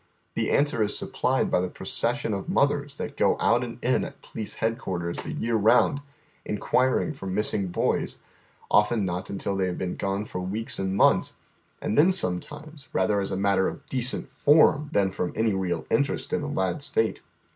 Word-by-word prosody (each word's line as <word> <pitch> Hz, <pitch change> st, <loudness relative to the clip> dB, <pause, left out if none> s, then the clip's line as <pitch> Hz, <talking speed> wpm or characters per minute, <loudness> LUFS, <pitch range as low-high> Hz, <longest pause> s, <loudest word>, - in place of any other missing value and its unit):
Tiie -, -, 0 dB
answer 140 Hz, -5 st, +2 dB
is 105 Hz, -1 st, +2 dB
supplied -, -, 0 dB
by -, -, +3 dB
the 90 Hz, -, -2 dB
procession 110 Hz, -, -1 dB
of 100 Hz, -, -4 dB
mothers 145 Hz, -4 st, +1 dB
that -, -, -6 dB
go -, -, +2 dB
out 120 Hz, +2 st, +3 dB
and 120 Hz, -1 st, -6 dB
in 125 Hz, -, +2 dB
at -, -, -8 dB
Police 110 Hz, -2 st, -6 dB
Headquarters 90 Hz, -6 st, -2 dB
the -, -, -6 dB
year 115 Hz, 0 st, -1 dB
round, 125 Hz, +7 st, +3 dB, 0.4 s
inquiring 130 Hz, +7 st, +1 dB
for 115 Hz, -9 st, -8 dB
missing 100 Hz, 0 st, +1 dB
boys, 90 Hz, -, -1 dB, 0.5 s
often 105 Hz, 0 st, +3 dB
not 90 Hz, 0 st, -3 dB
until 100 Hz, 0 st, -2 dB
they 95 Hz, -1 st, 0 dB
have 90 Hz, -, -3 dB
been 90 Hz, -1 st, -3 dB
gone 100 Hz, +1 st, -2 dB
for 90 Hz, -, -5 dB
weeks 105 Hz, +5 st, -2 dB
and 95 Hz, 0 st, -1 dB
months, -, -, +3 dB, 0.5 s
and 105 Hz, -, -1 dB
then 175 Hz, +5 st, +6 dB
sometimes 145 Hz, -, -1 dB
rather 100 Hz, +2 st, +1 dB
as 95 Hz, -, -3 dB
a -, -, -2 dB
matter 100 Hz, -1 st, +2 dB
of -, -, -7 dB
decent 130 Hz, -1 st, -1 dB
form 150 Hz, 0 st, +4 dB
than 100 Hz, -10 st, +2 dB
from 90 Hz, -, -3 dB
any 110 Hz, -1 st, +1 dB
real 90 Hz, -4 st, -2 dB
interest 140 Hz, +4 st, 0 dB
in -, -, +1 dB
the 150 Hz, -, -4 dB
lad's 95 Hz, +2 st, -2 dB
fate. 110 Hz, -1 st, 0 dB
105 Hz, 185 wpm, -26 LUFS, 95-135 Hz, 0.5 s, then